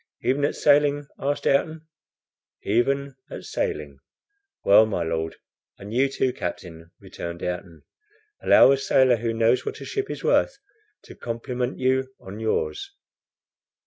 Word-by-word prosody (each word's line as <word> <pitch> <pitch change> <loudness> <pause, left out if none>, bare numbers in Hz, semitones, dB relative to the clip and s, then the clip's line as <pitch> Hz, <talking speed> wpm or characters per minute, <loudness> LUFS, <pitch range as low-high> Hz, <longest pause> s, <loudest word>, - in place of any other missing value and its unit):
"Even 135 +3 +1
at - - -1
sailing?" 145 0 +3
asked 145 +1 -2
Ayrton. 155 +3 +1 0.8
"Even 140 +6 0 0.2
at - - -8
sailing." 70 -2 -4 0.7
"Well, 105 +2 +7
my 95 -5 -2
Lord, 80 0 -3 0.4
and 100 +2 -9
you 135 +3 +2
too, 130 -1 0
captain," 85 -5 -7
returned 85 -3 -8
Ayrton, 90 -2 -5 0.6
"allow - - +7
a 140 - +3
sailor 130 -2 +3
who 115 +1 -2
knows 115 +2 +2
what - - -5
a - - -8
ship 405 -1 -3
is - - -6
worth, - - +2 0.5
to - - -12
compliment 125 +2 -4
you 130 0 0
on 100 +3 -9
yours." 390 - -2
125 Hz, 140 wpm, -24 LUFS, 100-140 Hz, 0.8 s, Well